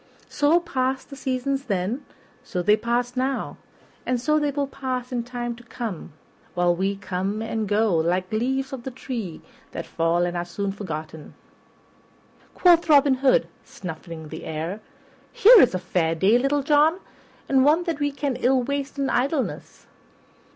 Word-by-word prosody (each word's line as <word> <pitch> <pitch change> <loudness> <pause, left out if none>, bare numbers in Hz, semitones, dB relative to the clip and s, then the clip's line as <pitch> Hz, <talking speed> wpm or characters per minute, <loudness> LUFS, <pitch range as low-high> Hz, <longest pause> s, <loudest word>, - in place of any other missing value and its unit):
So 300 +4 +3
passed 265 -5 -2
the - - -7
seasons 270 +1 -2
then, 205 +5 -2 0.4
so 180 -3 -3
they 210 +4 +5
pass 240 +3 -1
now, 260 +2 -2 0.5
and 250 -1 -1
so 305 +5 +2
they 295 -1 0
will 285 0 -1
pass 260 -2 -4
in 245 -1 -1
time 240 -1 -4
to 240 - -14
come, 225 -9 -6 0.4
while 175 0 +2
we 195 +3 -1
come 195 +1 -3
and 225 -1 -2
go 205 -3 +2
like 180 +3 0
leaves 265 +5 -1
of 265 - -5
the 265 - -5
tree 240 - -6 0.3
that - - -5
fall 165 +1 +1
and 175 0 -3
are 175 - -1
soon 195 +3 -3
forgotten. 160 -6 -7 1.2
Quoth 345 -2 +4
Robin 285 -2 +6
Hood, 270 -2 +4 0.2
snuffing 160 -2 -8
the - - -8
air, 160 +6 -4 0.5
"Here 460 +1 +8
is 235 - +4
a - - +2
fair 175 -2 0
day, 200 +8 +4
Little 275 +2 +1
John, 300 +3 +4 0.5
and 265 -1 +4
one 310 +5 +4
that 335 -4 -3
we 290 0 0
can 275 -2 -2
ill 255 0 +2
waste 280 +2 -3
in 275 -1 0
idleness. 270 +2 -2
245 Hz, 165 wpm, -24 LUFS, 185-275 Hz, 1.2 s, Here